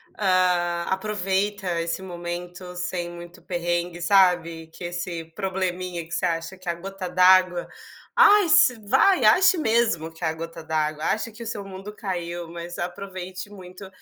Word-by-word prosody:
ah, 180 -3 +2
aproveita 195 -2 -1
esse 165 +2 -3
momento 180 0 -7
sem 180 -1 -3
muito 175 0 -11
perrengue, 175 0 -2
sabe, 175 -3 +3
que 165 - -12
esse 175 -1 -4
probleminha 185 -3 -3
que 165 - -20
você 180 - -1
acha 165 +2 -2
que 185 -1 -16
é - - +3
a - - -5
gota 190 +1 -6
d'água. 185 0 +4 0.5
Ai, 410 -4 +6
se 250 -6 +5
vai, 265 - +4
ache 355 - +6
mesmo 220 - +1
que 165 +1 -6
a 160 - 0
gota 165 0 -8
d'água, 155 -1 -1
acha 225 +1 -1
que 235 +2 -10
o - - -7
seu 215 -2 -4
mundo 195 +2 -9
caiu, 175 -3 -4
mas 170 +1 -7
aproveite 185 +1 -6
muito 185 0 -11
180 Hz, 160 wpm, -24 LUFS, 170-195 Hz, 0.5 s, Ai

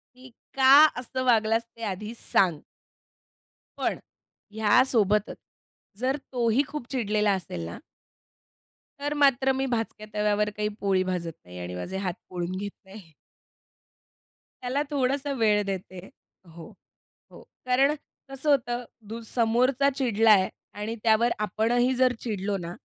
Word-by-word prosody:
की 255 +1 -14 0.3
"का 265 0 +6 0.3
असं 255 +1 -4
वागलास, 225 -1 +3
ते 230 - -11
आधी 215 +4 -8
सांग." 175 -5 +2 1.2
पण - - -1 0.5
ह्या 220 +3 +4
सोबतच, 210 -4 +1 0.6
जर 260 +3 0 0.2
तोही 240 +1 +2
खूप 300 -5 -6
चिडलेला 210 -4 +1
असेल 175 - -4
ना 85 - -7 1.2
तर 290 +1 -2
मात्र 270 -2 +3
मी 265 +1 -1
भाचक्या 225 -3 -3
तव्यावर 210 0 +1
काही 210 0 0
पोळी 195 -2 +2
भाजत 180 -3 -3
नाही 90 0 -11
आणि 90 0 -6
माझे 135 - -5
हात 185 -3 -2
पोळून 180 0 -4
घेत 205 +2 -4
नाही. 190 -4 -13 1.5
त्याला 255 +3 0
थोडंसं 280 0 0
वेळ 210 -2 +3
देते 185 -1 -6 0.4
हो, 165 -1 -12 0.6
हो. - - -14 0.2
कारण 270 +4 +3 0.3
कसं 270 +2 -2
होतं 245 -3 +1 0.2
दू 225 +2 -6
समोरचा 250 +4 +3
चिडलाय 220 -6 +4 0.3
आणि 210 +3 -4
त्यावर 230 +1 +4
आपणही 230 +5 +1
जर 255 0 +4
चिडलो 205 -3 -2
ना, 170 -1 -6
220 Hz, 130 wpm, -26 LUFS, 195-255 Hz, 1.5 s, का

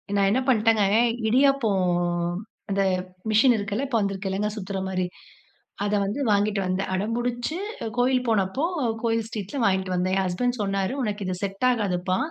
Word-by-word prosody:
நான் 200 -1 +3
என்ன 255 - +2
பண்ணிட்டேங்க, 225 -3 +4 0.4
இடியாப்பம் 240 -6 +3 0.8
அந்த 195 0 +1 0.5
மிஷின் 240 +3 +5
இருக்குல, 210 +5 -2
இப்போ 240 - +1
வந்துருக்குலங்க 195 +1 -1
சுத்துற 200 -2 -4
மாரி. 185 -1 -1 0.8
அத 205 - -1
வந்து 205 +8 -3
வாங்கிட்டு 205 0 +2
வந்தேன். 185 +1 -1
அடம்புடிச்சு 240 - -2 0.4
கோயில் 250 +1 +2
போனப்போ 220 - +1 0.4
கோயில் 225 -1 +1
ஸ்ட்ரீட்ல 215 +4 -5
வாங்கிட்டு 190 -1 +1
வந்தேன். 185 +1 +1
என் 195 - +1
ஹஸ்பண்ட் 245 +7 -1
சொன்னாரு 195 +3 -1
உனக்கு 210 -2 -2
இது 185 - -1
செட் 195 +4 -2
ஆகாதுப்பா. 185 -5 0
205 Hz, 140 wpm, -25 LUFS, 195-240 Hz, 0.8 s, மிஷின்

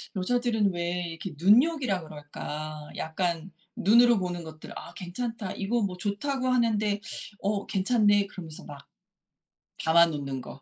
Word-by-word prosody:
여자들은 220 0 +1
왜 175 - -2 0.3
이렇게 165 +2 -6
눈요기라 230 - +4
그럴까. 150 0 -7
약간 170 +1 -2 0.2
눈으로 235 +3 +6
보는 175 -2 -3
것들. 155 -1 -10
'아 - - -9
괜찮다. 210 +2 -4
이거 225 +4 0
뭐 185 -3 -2
좋다고 255 +7 -2
하는데 215 -5 +2 0.4
어 200 0 -1
괜찮네.' 205 0 +3
그러면서 165 -6 -9
막 140 -1 -11 1.0
담아 170 +1 +6
놓는 140 -4 -4
거. 135 +2 -11
195 Hz, 290 characters per minute, -28 LUFS, 165-225 Hz, 1.0 s, 눈으로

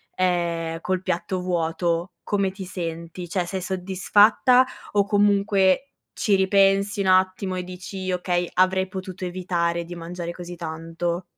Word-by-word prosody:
ehm, 170 -2 0
col 185 0 -1
piatto 185 +1 -2
vuoto, 170 0 -1
come 200 -2 0
ti 195 0 -8
senti? 170 -1 -6
Cioè 180 +1 -1
sei 190 +1 -3
soddisfatta 200 +7 +4 0.3
o 205 -1 +3
comunque 200 0 +3 0.4
ci 205 - +1
ripensi 195 +1 +3
un 195 - -1
attimo 185 0 +2
e 180 - -3
dici: 185 +1 -6
“Okay, 180 -1 -1
avrei 190 +1 +3
potuto 185 -1 -7
evitare 175 -2 -1
di 175 - -8
mangiare 170 0 -6
così 175 0 -8
tanto?”. 165 +2 -4
185 Hz, 135 wpm, -24 LUFS, 175-190 Hz, 0.4 s, soddisfatta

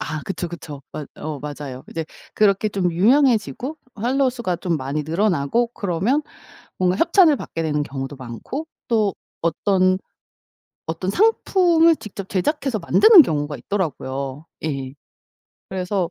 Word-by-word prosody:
아 155 -1 -3
그쵸 185 -2 -4
그쵸. 150 -4 -9
맞 150 - -6
어 155 -2 -5
맞아요. 145 -3 -7
이제 165 -1 -3 0.3
그렇게 210 0 +3
좀 190 -3 0
유명해지고 240 - +2 0.2
팔로우 255 +4 +1
수가 225 -8 -2
좀 170 -2 -1
많이 140 +2 -3
늘어나고 175 +6 +1
그러면 205 - 0 0.6
뭔가 180 0 +2
협찬을 335 -3 +5
받게 165 - -5
되는 150 -2 0
경우도 135 0 -6
많고 130 - -6 0.2
또 215 -4 +2 0.3
어떤 185 +3 +2 0.9
어떤 165 +4 -2
상품을 350 - +4
직접 195 -5 -8
제작해서 245 - -1
만드는 360 - +7
경우가 145 - -2
있더라고요. 140 -3 -3 0.2
예. 135 -4 -3 0.7
그래서 185 -1 -1
185 Hz, 295 characters per minute, -22 LUFS, 150-235 Hz, 0.9 s, 만드는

